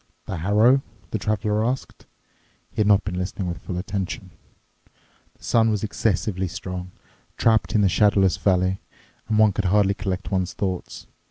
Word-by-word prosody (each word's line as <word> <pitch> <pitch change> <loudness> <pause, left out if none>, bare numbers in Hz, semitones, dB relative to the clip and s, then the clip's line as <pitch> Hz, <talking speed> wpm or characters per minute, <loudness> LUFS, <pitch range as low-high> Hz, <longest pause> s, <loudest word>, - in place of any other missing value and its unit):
"The 95 - -4
harrow?" 105 +10 +4 0.3
the 110 - -1
Traveler 105 +1 0
asked. 125 +3 -4 0.6
He - - -28
had 105 - +3
not 105 -1 +5
been 90 -2 -3
listening 95 0 -3
with 85 -1 -4
full 90 - -5
attention. 95 -1 -4 1.1
The - - -24
sun 115 -1 +3
was 105 -1 -1
excessively 100 -3 -1
strong, 90 +1 -6 0.5
trapped 110 -1 +2
in 105 - +4
the 100 - +4
shadowless 95 -1 +3
valley, 95 -1 +1 0.5
and 110 - +1
one 110 -1 +6
could 100 - -2
hardly 100 +1 +3
collect 95 -1 -4
one's 95 -1 0
thoughts. 95 -3 -4
100 Hz, 160 wpm, -23 LUFS, 95-105 Hz, 1.1 s, one